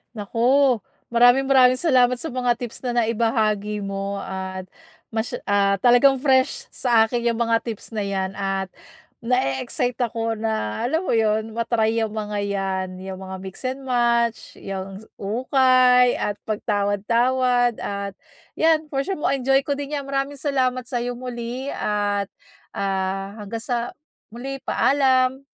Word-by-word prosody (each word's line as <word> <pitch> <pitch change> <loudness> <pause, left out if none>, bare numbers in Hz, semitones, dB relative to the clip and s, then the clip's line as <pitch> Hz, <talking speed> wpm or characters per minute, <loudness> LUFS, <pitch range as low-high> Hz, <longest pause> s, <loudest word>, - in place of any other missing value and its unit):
Naku, 210 +2 -5 0.7
maraming 245 +3 +4
maraming 255 -1 +6
salamat 250 -6 +3
sa 325 - -4
mga 250 -1 +1
tips 245 +2 -6
na 240 -1 +1
naibahagi 215 -2 0
mo, 195 0 -4
at 190 -1 -6 0.4
mas 220 +2 -3 0.2
ah, 200 -1 +3
talagang 250 +2 +5
fresh 275 - +2
sa 235 -3 +3
akin 240 +2 -2
'yong 235 -1 +1
mga 230 -1 +2
tips 225 -3 -6
na 210 -2 -2
'yan 190 -1 -2
at 195 -1 -2 0.6
nae-excite 240 - 0
ako 225 -1 -3
na, 220 - -2
alam 320 +7 0
mo 370 - -1
'yon, 220 0 +1
ma-try 230 -1 +1
'yong 220 -2 -1
mga 210 -1 -3
yan, 195 -2 -2
'yong 190 0 -6
mga 190 0 -7
mix 190 0 -8
and 260 +2 -3
match, 235 -3 0
'yang 195 0 -7 0.2
ukay, 250 +3 +4
at 205 - -2
pagtawad-tawad 230 +4 +1
at 200 -1 -4 0.4
'yan, 320 -1 +2
for 270 - +1
sure 385 +6 -3
ma-enjoy 270 -1 +1
ko 285 - 0
din 285 +1 -4
'yan. 280 - -5
Maraming 275 +1 -2
salamat 255 -3 0
sa 245 -1 -2
'yo 245 0 -3
muli 250 +2 -5
at, 205 -1 -1 0.5
ah, 195 0 -2
hanggang 225 +2 -5
sa 240 -1 -3 0.3
muli. 265 +4 -6
Paalam. 265 -1 +2
235 Hz, 145 wpm, -23 LUFS, 205-255 Hz, 0.7 s, maraming